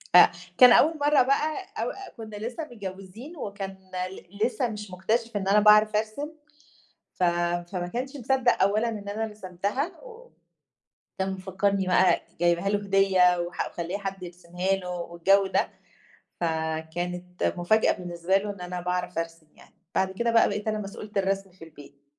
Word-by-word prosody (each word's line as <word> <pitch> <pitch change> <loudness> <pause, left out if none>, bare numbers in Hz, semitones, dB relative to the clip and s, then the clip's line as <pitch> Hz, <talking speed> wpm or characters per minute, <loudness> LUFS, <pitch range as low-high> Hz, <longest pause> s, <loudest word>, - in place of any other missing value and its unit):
أ 175 - +9 0.3
كان 250 -1 +9
أول 315 +5 +5
مرَّة 290 -2 +4
بقى 300 +4 +1 0.2
أو - - -1
أ 395 0 -10
كنّا 215 -2 -8
لسّه 235 +9 -5
متجوزين 200 - -9
وكان 195 -4 -6 0.3
ل 200 +3 -4
لسه 250 0 0
مش 210 -2 -7
مكتشِف 220 +4 -1
إن 195 -1 -3
أنا 205 +2 +5
باعرَف 210 0 +6
أرسم، 220 +8 -2 0.8
ف 185 - -3 0.5
فما 175 -1 -2
كانش 265 +4 -3
مصدّق 260 0 +2
أولًا 215 +4 +2
إن 205 -3 -6
أنا 220 +2 -2
رسمتها 210 - -3
و - - -13 0.9
كان 190 0 0
مفكّرني 190 +1 -1
بقى 180 -1 +4 0.2
جايبها 175 +2 +2
له 205 - +2
هدية 195 -3 +3
وح 175 0 -2
ومخليّة 175 +3 -4
حد 195 -2 -5
يرسمها 180 +1 -4
له 185 -2 -7
والجو 180 +3 +2
ده، - - +1 0.7
فكانت 170 +2 -3
مفاجأة 215 +6 +3
بالنسبة 175 +1 -1
له 205 +1 -1
إن 200 -2 -8
أنا 180 0 -5
باعرَف 180 -1 -2
أرسم 165 -1 -5
يعني. - - -19 0.2
بَعد 190 0 +1
كده 235 +5 -1
بقى 230 - +5
بقيت 210 +2 -3
أنا 215 - 0
مسؤولة 205 +1 -7
الرسم 195 0 0
في 180 -2 -13
البيت، 145 -3 -16
195 Hz, 160 wpm, -26 LUFS, 180-220 Hz, 0.9 s, أ